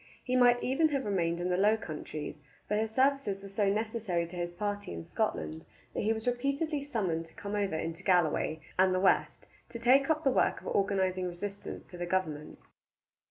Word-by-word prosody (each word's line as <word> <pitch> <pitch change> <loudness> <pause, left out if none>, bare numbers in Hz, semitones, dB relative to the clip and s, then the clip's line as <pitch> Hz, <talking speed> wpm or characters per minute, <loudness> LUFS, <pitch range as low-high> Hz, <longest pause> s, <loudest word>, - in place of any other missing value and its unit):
He 250 - -1
might 245 -1 +5
even 310 +5 +3
have 275 -3 -1
remained 170 -4 0
in 175 +1 -1
the 180 - +1
Low 210 +3 +4
Countries, 150 -4 -6 0.3
but 210 - +1
his 220 0 0
services 260 -5 +1
were 200 - -8
so 200 0 +1
necessary 210 -4 -1
to 170 +2 -10
his 175 0 -3
party 205 +3 -3
in 85 -1 -6
Scotland 80 +1 -2 0.3
that - - -1
he 215 - +2
was 220 0 -2
repeatedly 280 +5 0
summoned 185 - -2
to - - -20
come 200 0 -6
over 200 -5 0
into 165 +2 -4
Galloway 165 -4 +2 0.2
and 185 0 +5
the - - +2
west 190 - +2 0.2
to 235 - -6
take 260 +4 +4
up 315 0 +2
the 270 - +4
work - - +2
of - - -17
organizing 190 -2 +1
resistance 200 +3 -6
to 180 - -11
the 175 - -2
government. 160 -5 -2
200 Hz, 200 wpm, -31 LUFS, 175-235 Hz, 0.3 s, might